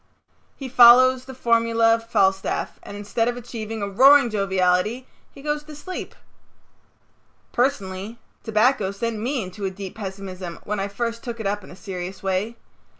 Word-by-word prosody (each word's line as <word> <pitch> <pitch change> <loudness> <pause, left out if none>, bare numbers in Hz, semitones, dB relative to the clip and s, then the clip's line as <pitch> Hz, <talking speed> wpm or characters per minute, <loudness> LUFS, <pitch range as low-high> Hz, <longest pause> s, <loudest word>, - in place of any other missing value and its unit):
He 270 - -7
follows 255 +1 +7
the 265 - -9
formulæ 230 -2 +3
of 230 0 -3
Falstaff 195 -2 0
and 205 - -9
instead 205 +3 -1
of 245 0 -1
achieving 225 -3 -6
a - - -1
roaring 265 +5 +6
joviality 195 +3 +1 0.3
he 275 - -14
goes 295 0 -1
to 305 -1 -10
sleep. 370 +5 -7 1.4
Personally 215 -4 -2 0.3
tobacco 220 -1 +2
sent 220 +3 -3
me 250 +2 -2
into 185 +2 -9
a 195 - 0
deep 190 0 -8
pessimism 190 -4 -7
when 210 0 -3
I 195 - -1
first 230 +3 -4
took 235 -2 -6
it 220 - -5
up 205 0 -1
in - - -13
a - - -11
serious 185 0 -7
way. 195 +5 -1
220 Hz, 160 wpm, -23 LUFS, 195-245 Hz, 1.4 s, follows